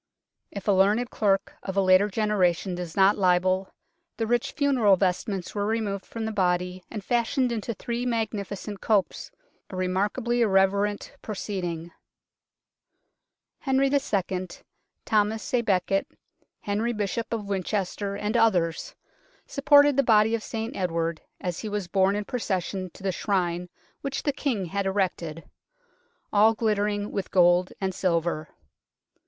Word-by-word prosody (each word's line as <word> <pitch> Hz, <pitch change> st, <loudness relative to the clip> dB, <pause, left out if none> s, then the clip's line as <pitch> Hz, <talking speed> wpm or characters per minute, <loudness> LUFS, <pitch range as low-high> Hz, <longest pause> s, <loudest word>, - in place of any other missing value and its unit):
If 200 Hz, 0 st, -8 dB
a -, -, +5 dB
learned 205 Hz, +5 st, +3 dB
clerk 195 Hz, -2 st, +1 dB
of 190 Hz, 0 st, -5 dB
a -, -, +5 dB
later 185 Hz, +2 st, +5 dB
generation 195 Hz, -4 st, +1 dB
does 175 Hz, -2 st, -6 dB
not 195 Hz, +1 st, +4 dB
libel, 185 Hz, +1 st, +2 dB, 0.5 s
the 225 Hz, -, 0 dB
rich 240 Hz, +1 st, 0 dB
funeral 260 Hz, -9 st, +4 dB
vestments 190 Hz, 0 st, -1 dB
were 205 Hz, -1 st, -1 dB
removed 215 Hz, -3 st, -2 dB
from 225 Hz, -1 st, -5 dB
the 220 Hz, -, -2 dB
body 180 Hz, -2 st, 0 dB
and 215 Hz, -3 st, -6 dB
fashioned 240 Hz, +2 st, +1 dB
into 230 Hz, 0 st, -3 dB
three 235 Hz, +4 st, -3 dB
magnificent 210 Hz, -3 st, -3 dB
copes 205 Hz, -4 st, 0 dB, 0.4 s
a 190 Hz, -, -8 dB
remark 185 Hz, +3 st, 0 dB
ably 240 Hz, -1 st, 0 dB
irreverent 200 Hz, 0 st, +2 dB
proceeding. 175 Hz, -5 st, -4 dB, 1.7 s
Henry 270 Hz, 0 st, +2 dB
II., 190 Hz, -9 st, 0 dB, 0.6 s
Thomas 215 Hz, +2 st, 0 dB
a 245 Hz, -, +3 dB
Becket, 195 Hz, -2 st, +1 dB, 0.5 s
Henry 215 Hz, +4 st, -1 dB
Bishop 215 Hz, +2 st, -3 dB
of 225 Hz, -3 st, -2 dB
Winchester 200 Hz, +1 st, -2 dB
and 210 Hz, +3 st, -2 dB
others 180 Hz, -8 st, +1 dB, 0.5 s
supported 285 Hz, 0 st, +5 dB
the -, -, +6 dB
body 220 Hz, -3 st, +4 dB
of 230 Hz, -, 0 dB
St 225 Hz, +1 st, -5 dB
Edward 165 Hz, -3 st, -1 dB, 0.2 s
as 180 Hz, -2 st, -3 dB
he 215 Hz, -, -4 dB
was 205 Hz, -3 st, -3 dB
borne 190 Hz, +2 st, +2 dB
in 210 Hz, 0 st, -2 dB
procession 190 Hz, -5 st, -2 dB
to -, -, -13 dB
the 195 Hz, -, +1 dB
Shrine 180 Hz, -2 st, -1 dB, 0.3 s
which 275 Hz, -1 st, -3 dB
the 285 Hz, -, 0 dB
King 245 Hz, -9 st, -1 dB
had 195 Hz, +3 st, -2 dB
erected, 180 Hz, -5 st, -2 dB, 0.4 s
" -, -, -40 dB
all 215 Hz, +2 st, +5 dB
glitter 210 Hz, -2 st, +1 dB
ing 205 Hz, 0 st, -3 dB
with 200 Hz, -2 st, -3 dB
gold 180 Hz, 0 st, +4 dB
and 190 Hz, -1 st, -1 dB
silver." 170 Hz, -4 st, -1 dB
200 Hz, 145 wpm, -26 LUFS, 185-220 Hz, 1.7 s, the